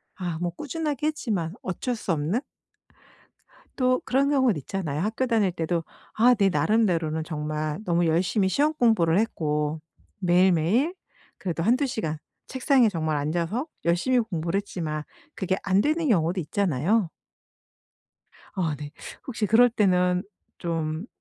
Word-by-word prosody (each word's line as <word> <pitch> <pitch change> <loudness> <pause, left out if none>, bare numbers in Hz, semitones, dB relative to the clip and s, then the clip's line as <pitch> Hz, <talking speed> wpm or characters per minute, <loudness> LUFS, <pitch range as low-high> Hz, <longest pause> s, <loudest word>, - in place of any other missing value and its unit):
아 175 -4 -4
뭐 175 -1 -1
꾸준하게 300 - -3
했지만 205 - -2
어쩔 240 +7 -2
수 210 -4 -3
없는? 165 - 0 1.4
또 255 -1 +2
그런 275 +2 +2
경우도 260 - +3
있잖아요. 155 0 -3
학교 225 +6 -1
다닐 220 -6 +2
때도 165 0 -2 0.3
아 245 +3 +5
내 200 -4 +3
나름대로는 165 -2 +1
정말 155 0 -3
너무 175 -2 +2
열심히 180 +5 +2
시 275 - +1
험공부를 225 - +3
했고 150 -7 -1 0.4
매일매일 185 - +3 0.4
그래도 170 -3 -3
1-2 250 - +3
시간 160 - -3 0.3
책상에 260 -2 +3
정말 160 -5 -1
앉아서 170 - -1 0.2
열심히 175 +10 +2
공부를 175 -4 -2
했지만 160 -6 -4 0.3
그게 190 -1 -1
안 195 0 +3
되는 310 +6 +1
경우도 180 -4 +2
있잖아요. 175 - 0 1.4
아 170 -6 -1
네. 145 -1 -7 0.4
혹시 230 -4 -2
그럴 240 +4 +5
때는 180 -4 +2 0.4
좀 165 +1 -3
185 Hz, 275 characters per minute, -25 LUFS, 160-230 Hz, 1.4 s, 아